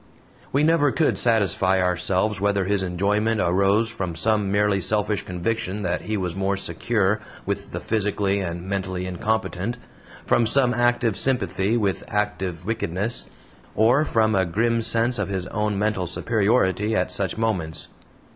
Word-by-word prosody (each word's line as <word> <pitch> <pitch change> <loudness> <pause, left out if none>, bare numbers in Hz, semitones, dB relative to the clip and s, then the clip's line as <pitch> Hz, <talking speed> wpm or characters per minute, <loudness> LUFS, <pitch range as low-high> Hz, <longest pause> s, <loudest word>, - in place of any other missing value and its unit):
We 140 +2 +2
never 155 -3 +3
could 155 - +1
satisfy 95 -5 +2
ourselves 90 +3 0
whether 100 -1 +1
his 100 0 +1
enjoyment 105 +5 0
arose 100 +5 +2
from 90 -6 -4
some 105 +3 +1
merely 100 -1 +2
selfish 105 +1 0
conviction 95 +2 -3
that 85 -2 -1
he 110 0 -2
was 90 -3 -3
more 95 +1 0
SECURE 100 +3 0 0.3
with - - -4
the - - -4
physically 100 -2 0
and 85 -2 -4
mentally 95 -1 -3
incompetent, 110 +3 -2 0.5
from 115 - +3
some 125 +1 +3
active 120 -2 +1
sympathy 120 -5 0
with 100 -4 -1
active 95 -5 -2
wickedness, 110 0 -1 0.5
or 120 +7 +4
from 110 -6 +2
a 95 -1 +3
grim 115 +6 0
sense 115 +2 +1
of - - -1
his 95 -2 -2
own 105 +1 -2
mental 105 -3 0
superiority 105 +1 +1
at - - 0
such 95 -1 -1
moments. 95 -9 -2
105 Hz, 145 wpm, -23 LUFS, 95-115 Hz, 0.5 s, or